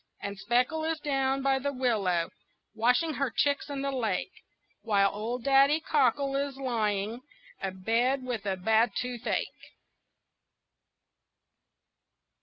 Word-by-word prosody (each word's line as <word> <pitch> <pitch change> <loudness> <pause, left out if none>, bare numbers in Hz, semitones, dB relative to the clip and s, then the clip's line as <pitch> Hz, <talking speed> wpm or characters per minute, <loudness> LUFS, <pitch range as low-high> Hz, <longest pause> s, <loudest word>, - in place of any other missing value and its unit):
And 200 -1 -5
Speckle 250 +9 +1
is 320 0 -1
down 270 -2 0
by 270 -1 +2
the 280 +2 -2
willow 205 -10 0 0.4
Washing 250 +8 +2
her 275 -2 -1
chicks 285 +5 0
in 280 -1 -3
the 275 - -1
lake, 230 - -1 0.5
While 200 -3 +2
old 230 +4 -4
Daddy 275 +3 +5
Cockle 275 -2 +1
is 280 -1 -2
lying 225 -3 -1 0.4
Abed 225 +8 0
with 235 -5 -4
a 190 -1 0
bad 220 +4 +2
toothache. 250 -1 -4
250 Hz, 115 wpm, -29 LUFS, 220-275 Hz, 0.5 s, Daddy